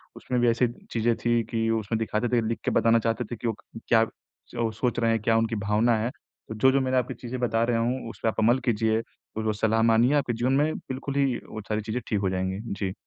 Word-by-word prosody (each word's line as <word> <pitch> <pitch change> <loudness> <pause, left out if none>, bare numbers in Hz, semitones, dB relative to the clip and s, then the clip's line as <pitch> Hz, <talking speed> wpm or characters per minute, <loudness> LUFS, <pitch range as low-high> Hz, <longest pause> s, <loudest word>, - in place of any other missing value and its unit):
उसमें 125 - -2
भी 120 - +4
ऐसी 120 +2 +2 0.2
चीज़ें 115 0 +1
थी 120 0 +3
कि 115 -1 0
उसमें 110 +1 -2
दिखाते 115 +1 -1
थे, 120 -2 +2
लिख 115 - -2
के - - +1
बताना 115 0 +4
चाहते 115 +2 -1
थे - - -2
कि 115 +1 -4
वो 115 - +1
क - - -12
क्या 115 -1 +5
च 115 - -20
अ, 115 -1 +1
सोच 120 +3 -1
रहे 115 -1 +2
हैं, 115 - +1
क्या 115 +1 +2
उनकी 115 0 0
भावना 110 +3 +3
है। 115 +2 -1 0.4
तो 110 - -5
जो-जो 130 +5 +4
मैंने 130 0 +1
आपको 125 +1 0
चीज़ें 125 +1 -6
बता 115 -2 +1
रहा 115 -1 +1
हूँ, 120 +1 -1
उस - - -11
पे - - +2
आप 110 - -4
अमल 120 +4 +4
कीजिए 110 -2 +2 0.4
और 110 - -1
जो 110 - +1
सलाह 110 +2 +1
माननी 115 +2 +4
है, 145 - +2
आपके 135 -4 0
जीवन 120 +3 0
में 150 +3 +2
बिल्कुल 135 -2 -6
ही 140 0 +3 0.2
वो 110 - -6
सारी 105 0 0
चीज़ें 110 +4 -3
ठीक 105 - +1
हो 95 -1 0
जाएँगी। 95 +1 -2 0.2
जी। 95 -2 -2
115 Hz, 260 wpm, -26 LUFS, 110-120 Hz, 0.4 s, क्या